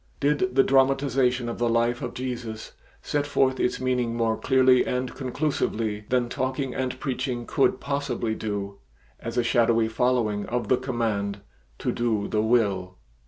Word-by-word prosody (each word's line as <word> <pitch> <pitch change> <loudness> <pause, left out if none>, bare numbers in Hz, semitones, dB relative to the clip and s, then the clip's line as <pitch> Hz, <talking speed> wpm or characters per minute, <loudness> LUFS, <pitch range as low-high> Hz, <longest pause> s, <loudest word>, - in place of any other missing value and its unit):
Did 140 -3 +1
the 135 - +6
dramatization 135 -2 +2
of 115 - -4
the 120 -1 +2
life 120 +1 +1
of - - -5
Jesus 120 -4 -5 0.3
set 145 0 -1
forth 130 -2 +2
its 125 0 0
meaning 125 -2 0
more 115 -1 +1
clearly 130 +1 +4
and 125 0 -2
conclusively 120 -6 -2
than 125 -1 +2
talking 130 +1 -2
and 130 0 -3
preaching 130 -3 -3
could 135 - +2
possibly 140 -5 -2
do 100 -2 -4 0.4
as 115 +1 -6
a 120 - +3
shadowy 115 -1 +3
following 110 -3 0
of 120 -3 -2
the 130 - +4
command 110 -6 -2 0.4
"to - - -1
do 110 -4 0
the 105 - 0
will"? 100 -5 +1
120 Hz, 155 wpm, -25 LUFS, 110-130 Hz, 0.4 s, the